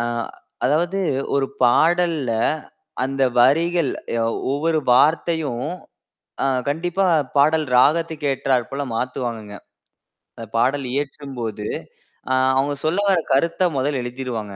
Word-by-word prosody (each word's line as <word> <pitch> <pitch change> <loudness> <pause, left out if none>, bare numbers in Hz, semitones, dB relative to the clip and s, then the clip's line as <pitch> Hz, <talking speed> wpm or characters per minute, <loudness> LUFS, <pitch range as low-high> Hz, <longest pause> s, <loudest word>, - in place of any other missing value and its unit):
அ 120 - 0 0.6
அதாவது 170 +7 +1 0.4
ஒரு 135 -1 +2 0.2
பாடல்ல 160 0 +3 0.7
அந்த 135 0 -2 0.2
வரிகள் 165 +3 +3 0.6
ஒவ்வொரு 160 +2 +1 0.2
வார்த்தையும் 150 -3 +2 0.8
அ - - +1 0.2
கண்டிப்பா 175 +5 0 0.3
பாடல் 155 +2 +4
ராகத்துக்கு 160 +2 +2
ஏற்றார் 130 -2 0
போல 140 +1 -2
மாத்துவாங்கங்க. 115 -4 -4 0.8
அந்தப் 115 -1 -10
பாடல் 130 +3 +1
இயற்றும்போது, 130 -7 -4 0.7
அ - - +3 0.2
அவங்க 140 +2 +1
சொல்ல 175 +6 +1
வர 185 -3 +4
கருத்தை 170 +6 +2
முதல் 135 +1 0
எழுதிடுவாங்க. 120 -5 -5
140 Hz, 105 wpm, -21 LUFS, 125-165 Hz, 0.8 s, பாடல்